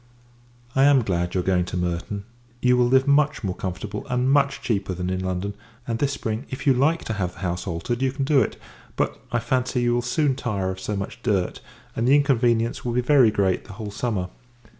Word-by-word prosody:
I 135 +1 +5
am 140 -3 +5
glad 90 -3 -1
you 90 - +2
are - - -6
going 90 -2 +2
to 90 - -4
Merton; 90 +3 -2 0.4
you 125 0 +4
will 125 -1 +3
live 130 +2 +4
much 145 -1 +3
more 95 -2 -1
comfortable, 95 +3 -5
and 125 +1 +1
much 140 -1 +3
cheaper, 100 -5 -1
than 90 +1 -3
in 95 0 -2
London: 95 +2 -2 0.3
and 115 -1 -2
this 140 -1 +1
spring, 110 -1 -4
if 130 - -6
you 135 - +6
like 155 +6 +2
to 110 - -3
have 90 -4 -2
the - - -15
house 90 0 -2
altered, 90 +8 -3
you 135 -1 +2
can 135 0 -2
do 140 -1 +4
it. 110 - -2 0.4
But, - - -1
I 120 - +1
fancy, 125 +1 0
you 120 0 +2
will 120 - +1
soon 135 +3 +1
tire 100 -7 -2
of 95 - -7
so 105 +2 -3
much 100 0 -5
dirt, 100 -6 0 0.4
and 115 +2 0
the 135 - +6
inconvenience 120 -5 +2
will 120 - -2
be 125 - +2
very 130 -3 +5
great 95 -3 0
the - - -10
whole 105 +1 -6
summer. 105 -4 -2
115 Hz, 225 wpm, -24 LUFS, 95-130 Hz, 0.4 s, you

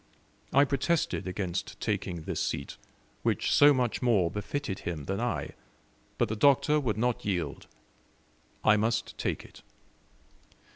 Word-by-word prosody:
I 140 +1 +5
protested 140 - 0
against 90 -2 -3
taking 85 -3 -2
this - - -3
seat, 70 - -3 0.4
which - - 0
so 145 0 +7
much 125 -4 0
more 105 -9 +3
befitted 105 +2 -3
him 80 -5 -5
than 95 +1 -2
I, 120 -1 -2 0.7
but 120 - +2
the 110 - -3
Doctor 140 +5 +4
would 115 -7 -1
not 120 +1 0
yield: 85 -8 -3 1.0
I 105 - +5
must 115 +2 0
take - - -2
it. - - -15
110 Hz, 135 wpm, -29 LUFS, 95-135 Hz, 1.0 s, so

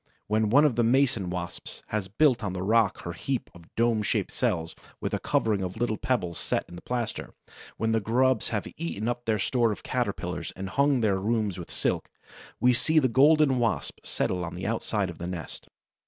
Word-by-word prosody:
When 110 0 +1
one 145 +7 +6
of 130 -6 +2
the 120 - +4
Mason 120 -5 +2
wasps 90 -1 -6
has 105 -3 -2
built 125 +4 +3
on 100 -3 -2
the 90 0 -3
rock 110 -1 +2
her 85 - -4
heap 130 +7 -3
of 85 -1 -15
dome 115 -1 +2
shaped 105 - -1
cells, 80 -2 -1 0.2
with - - -3
a - - 0
covering 105 -3 +1
of 90 +1 -4
little 120 -1 0
pebbles 90 -9 -1
set - - -1
in 85 - -11
the 85 - -9
plaster, 120 -3 -4 0.4
when 110 0 0
the 110 - +3
grubs 125 +2 +2
have - - -2
eaten 90 +7 -3
up 120 0 -2
their 110 -1 +2
store 115 +2 +1
of 105 - -6
Caterpillars - - -2
and 95 0 -5
hung 140 +1 +2
their 100 -3 +2
rooms 105 -2 0
with 85 - -8
silk, - - -1 0.5
we 125 0 +5
see 155 +6 +2
the 140 -4 +5
Golden 140 +1 +5
Wasp 115 -2 -1
settle 90 -1 -1
on 85 0 -5
the 90 - -5
outside 105 -3 -1
of 85 - -13
the 85 - -4
nest. 90 -3 -7
110 Hz, 205 wpm, -27 LUFS, 95-120 Hz, 0.5 s, one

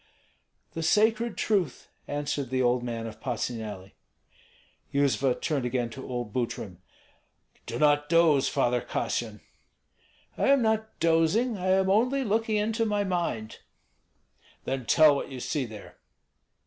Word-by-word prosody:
"The 165 - -5
sacred 220 +6 +2
truth," 190 - -1 0.2
answered 145 -2 -3
the 130 0 -1
old 120 0 +2
man 115 -2 -4
of 110 -1 -8
Patsuneli. 110 -6 -4 1.0
Yuzva 140 -2 +1
turned 145 -5 -1
again 125 -1 -1
to 130 +3 -9
old 120 -4 -4
Butrym. 115 -6 -3 0.9
"Do 120 - -4
not 145 +1 +3
doze, 165 -5 +4
Father 125 -3 +1
Kassyan!" - - -3 1.0
"I - - +2
am 275 -2 +4
not 220 0 -1
dozing, 165 +9 +2
I 185 -1 -4
am 190 0 +3
only 250 +7 +2
looking 220 0 0
into 220 +2 0
my 210 -2 0
mind." 170 - -3 1.0
"Then 130 -3 -4
tell 155 +5 +6
what - - -4
you 130 -2 -7
see 135 +2 -2
there." 110 -2 -11
145 Hz, 135 wpm, -27 LUFS, 125-205 Hz, 1.0 s, tell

